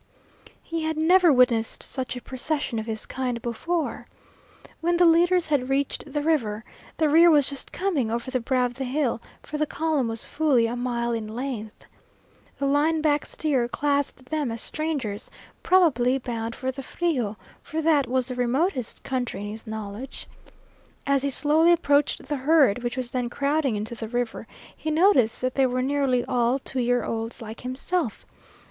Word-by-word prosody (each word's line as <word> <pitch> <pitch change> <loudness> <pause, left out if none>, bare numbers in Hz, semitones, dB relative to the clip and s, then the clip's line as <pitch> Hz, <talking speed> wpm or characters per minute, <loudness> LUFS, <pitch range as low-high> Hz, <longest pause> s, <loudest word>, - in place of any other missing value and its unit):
He 330 -1 -3
had 315 0 -2
never 350 +2 +5
witnessed 250 -4 +3
such 260 -2 -3
a 250 - -6
procession 265 -2 -1
of 220 - -6
his 220 -1 -2
kind 250 -2 -3
before. 310 +9 -3 0.7
When 345 +1 +1
the 350 - +5
leaders 345 +1 +4
had 270 -4 +1
reached 280 +2 -1
the 295 +1 -1
river, 230 -9 0 0.3
the 315 - +3
rear 330 +3 +6
was 295 -4 +5
just 280 -1 -4
coming 335 - -1
over 235 +3 -3
the 255 - 0
brow 250 +1 +1
of 245 - -3
the 265 +2 -5
hill, 255 -3 -1 0.2
for 300 - -5
the 305 - +1
column 310 -5 0
was 225 0 -1
fully 290 -6 +2
a 230 +1 -2
mile 240 -1 -1
in 225 -2 -3
length. 225 -2 -6 0.7
The 280 - -2
line 300 +3 +2
back 295 -1 +2
steer 270 -6 0
classed 280 0 -1
them 295 -3 -2
as 230 - -4
strangers, 270 -9 -3 0.3
probably 270 -9 +3
bound 230 -3 -4
for 260 0 -2
the 270 +1 -7
Frio, 255 -9 -2 0.2
for 320 - -5
that 305 -4 +3
was 255 0 0
the - - -3
remotest 250 - -1
country 250 -5 -3
in 205 0 -5
his 220 +2 -8
knowledge. 220 +4 -6 0.8
As 280 -1 +2
he 280 - 0
slowly 305 +5 +4
approached 290 -4 +2
the 295 - -2
herd, 270 -5 +3
which 240 +1 -3
was 250 -2 -2
then 250 -2 -1
crowding 280 -1 0
into 215 +3 -4
the 225 -1 -6
river, 240 0 -3 0.3
he 315 - -4
noticed 310 - +3
that 255 0 -1
they 270 -1 +3
were 255 0 -1
nearly 270 -3 +1
all 245 0 +1
two 265 -1 -5
year 245 -1 +1
olds 225 +1 -4
like 225 0 -8
himself. 255 - -3
260 Hz, 180 wpm, -25 LUFS, 240-305 Hz, 0.8 s, rear